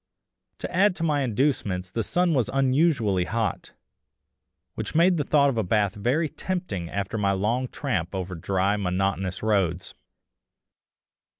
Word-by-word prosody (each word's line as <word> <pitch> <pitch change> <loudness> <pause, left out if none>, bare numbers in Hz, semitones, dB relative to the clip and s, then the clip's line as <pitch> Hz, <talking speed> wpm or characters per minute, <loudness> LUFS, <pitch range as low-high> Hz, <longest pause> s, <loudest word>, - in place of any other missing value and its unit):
To - - -6
add 195 +1 +4
to 165 - -4
my 150 -3 +1
inducements 115 -8 -1
the 115 - -1
sun 175 - +1
was 130 -5 +1
unusually 130 - +2
hot, 115 +2 -3 1.0
which - - -6
made 175 +2 +4
the 150 - 0
thought 140 0 +3
of 120 -4 -1
a - - +1
bath 100 0 +1
very 125 +10 0
tempting 160 - -4
after 100 +3 -3
my 100 -1 +2
long 115 +7 0
tramp 95 - -3
over 95 -1 -4
dry 95 +4 0
monotonous 95 0 -1
roads. 95 -4 0
110 Hz, 140 wpm, -25 LUFS, 95-140 Hz, 1.0 s, add